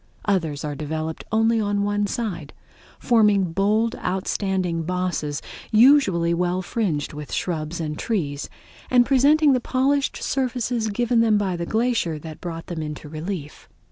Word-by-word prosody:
Others 165 -8 0
are 150 - -3
developed 155 +2 -4
only 225 +1 +3
on 205 -1 0
one 205 0 0
side, 190 - -4 0.4
forming 210 -7 +3
bold 215 +5 +1
outstanding 185 -2 -1
bosses 175 -4 -2 0.3
usually 215 -9 +5
well 180 +2 0
fringed 175 -9 -2
with 150 -1 -8
shrubs 165 -1 -3
and 150 -2 -4
trees, 150 -11 -2 0.4
and 245 -1 +5
presenting 285 +3 +4
the 255 - +2
polished 270 +3 0
surfaces 245 -3 -1
given 235 +3 +1
them 225 -2 +4
by 195 -3 0
the 170 0 -4
glacier 225 -8 0
that 155 0 -9
brought 165 -2 -6
them 170 -3 -5
into 150 0 -6
relief. 155 0 -6
190 Hz, 140 wpm, -23 LUFS, 160-230 Hz, 0.4 s, usually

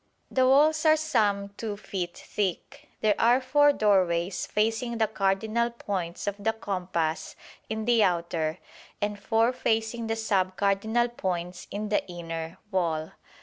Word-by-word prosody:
The 260 -1 +3
walls 305 +4 +4
are 310 - +7
some 210 -10 +1
2 215 -3 -4
feet 185 -4 -5
thick. 210 - -4
There 215 -1 +4
are 240 +3 +5
four 290 +3 +4
doorways 185 -6 +1
facing 225 +3 0
the 225 - +3
cardinal 215 +3 0
points 190 -7 -4
of 205 0 -4
the 225 +1 +2
compass 180 -6 -2 0.3
in 220 0 -3
the 235 -2 +4
outer, 170 -3 0 0.4
and 205 0 -2
four 225 +4 +2
facing 225 0 -1
the 225 - 0
sub 195 -4 0
cardinal 220 +4 +2
points 180 -6 -4
in 210 +1 -4
the 210 - +1
inner, 165 -1 -6
wall. 165 -4 -1
205 Hz, 145 wpm, -27 LUFS, 185-230 Hz, 0.4 s, are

